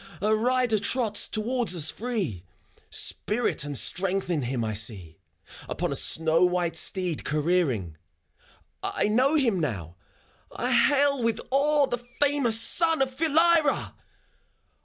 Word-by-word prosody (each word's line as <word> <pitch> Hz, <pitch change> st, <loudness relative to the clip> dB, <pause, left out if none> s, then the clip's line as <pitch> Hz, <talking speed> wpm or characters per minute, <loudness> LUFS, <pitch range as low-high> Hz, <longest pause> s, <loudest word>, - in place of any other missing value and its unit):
A 215 Hz, +1 st, +1 dB
rider 245 Hz, -1 st, +1 dB
trots 215 Hz, 0 st, 0 dB
towards 230 Hz, -1 st, -1 dB
us 155 Hz, -3 st, +1 dB
free: 200 Hz, -, -4 dB, 0.5 s
Spirit 225 Hz, -8 st, 0 dB
and 145 Hz, -2 st, -2 dB
strength 185 Hz, -, -1 dB
in 160 Hz, -4 st, -1 dB
him 120 Hz, -1 st, -3 dB
I 110 Hz, -, -3 dB
see, 100 Hz, -7 st, -2 dB, 0.2 s
— -, -, -17 dB
Upon -, -, -3 dB
a -, -, -2 dB
snow 165 Hz, +1 st, +2 dB
white 180 Hz, -2 st, 0 dB
steed 175 Hz, 0 st, -1 dB
careering.... 150 Hz, -, -1 dB, 0.8 s
I -, -, -2 dB
know 255 Hz, +8 st, +2 dB
him 235 Hz, -, +1 dB
now, 95 Hz, -, -4 dB, 0.5 s
I -, -, -2 dB
hail 285 Hz, -2 st, +3 dB
with 230 Hz, -1 st, -1 dB
awe 290 Hz, +2 st, +2 dB
The 245 Hz, -3 st, -4 dB, 0.2 s
famous 275 Hz, -6 st, +2 dB
son 325 Hz, +4 st, +3 dB
of 260 Hz, -1 st, -6 dB
Philyra 325 Hz, 0 st, +2 dB
210 Hz, 135 wpm, -25 LUFS, -, 0.8 s, hail